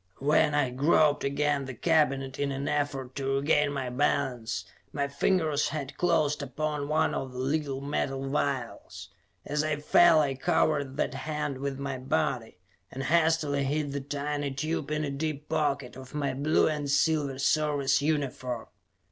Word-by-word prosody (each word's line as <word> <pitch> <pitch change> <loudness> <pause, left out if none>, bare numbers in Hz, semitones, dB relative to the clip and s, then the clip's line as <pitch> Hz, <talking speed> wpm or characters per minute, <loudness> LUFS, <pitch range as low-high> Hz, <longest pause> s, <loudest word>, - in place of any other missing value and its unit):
When 150 +1 +3
I 145 - +4
had 125 -1 -4
groped 150 0 +3
against 140 0 0
the 130 - -6
cabinet 140 -3 +1
in 140 -1 0
an 135 +1 -3
effort 140 -3 -2
to 135 0 0
regain 145 +1 +2
my 130 -3 -3
balance, 125 -8 -1 0.3
my 140 -1 -1
fingers 150 +1 +1
had 145 -2 -5
closed 155 -4 +1
upon 145 +2 -3
one 155 +1 +1
of 130 -1 -4
the - - -8
little 135 +1 -1
metal 135 -1 -2
vials. 135 -3 -3 0.4
As 150 +1 0
I 155 -1 0
fell, 160 +2 +5
I 140 -3 +1
covered 140 +1 0
that - - 0
hand 150 0 -3
with 140 0 -3
my 140 -1 -4
body 135 -6 -1 0.3
and 135 - -5
hastily 160 -3 +2
hid 145 +1 -1
the 140 0 -3
tiny 145 +1 -3
tube 150 +2 -3
in 155 0 -1
a 145 - -2
deep 150 +1 -3
pocket 140 -4 -1
of 130 +1 -11
my 140 -3 -1
blue 145 +4 +2
and 150 -2 -2
silver 145 -1 +1
Service 140 -1 +2
uniform. 135 -5 -2
140 Hz, 165 wpm, -28 LUFS, 135-150 Hz, 0.4 s, fell